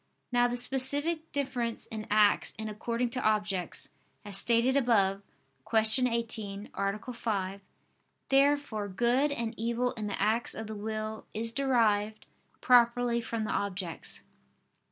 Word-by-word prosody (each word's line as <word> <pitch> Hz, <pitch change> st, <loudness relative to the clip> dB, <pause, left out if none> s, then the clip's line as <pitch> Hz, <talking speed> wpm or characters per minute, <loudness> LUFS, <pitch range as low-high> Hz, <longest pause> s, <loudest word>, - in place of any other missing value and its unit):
Now 245 Hz, 0 st, +4 dB
the 245 Hz, 0 st, -2 dB
specific 285 Hz, +6 st, +1 dB
difference 260 Hz, -5 st, -2 dB
in 215 Hz, -1 st, -7 dB
acts 210 Hz, -1 st, +3 dB
is 220 Hz, 0 st, -4 dB
according 230 Hz, +3 st, -2 dB
to 255 Hz, +1 st, -3 dB
objects, 205 Hz, -5 st, -1 dB, 0.4 s
as 205 Hz, -1 st, -4 dB
stated 235 Hz, +5 st, +3 dB
above 200 Hz, -7 st, +3 dB, 0.5 s
(Q. 220 Hz, +3 st, +3 dB
18, 220 Hz, -3 st, -3 dB
A. 200 Hz, +5 st, -2 dB
5). 200 Hz, -4 st, -2 dB, 0.7 s
Therefore 275 Hz, -6 st, +2 dB
good 240 Hz, +8 st, +2 dB
and 235 Hz, -5 st, -2 dB
evil 235 Hz, +2 st, 0 dB
in 220 Hz, -4 st, -5 dB
the 200 Hz, -, -3 dB
acts 220 Hz, +4 st, +1 dB
of 220 Hz, -, -5 dB
the 215 Hz, 0 st, -6 dB
will 215 Hz, +1 st, -4 dB
is 225 Hz, +1 st, -2 dB
derived 220 Hz, -5 st, +1 dB, 0.4 s
properly 240 Hz, -1 st, +4 dB
from 230 Hz, -1 st, -3 dB
the 215 Hz, -, -2 dB
objects. 185 Hz, -4 st, -3 dB
230 Hz, 135 wpm, -30 LUFS, 210-245 Hz, 0.7 s, Now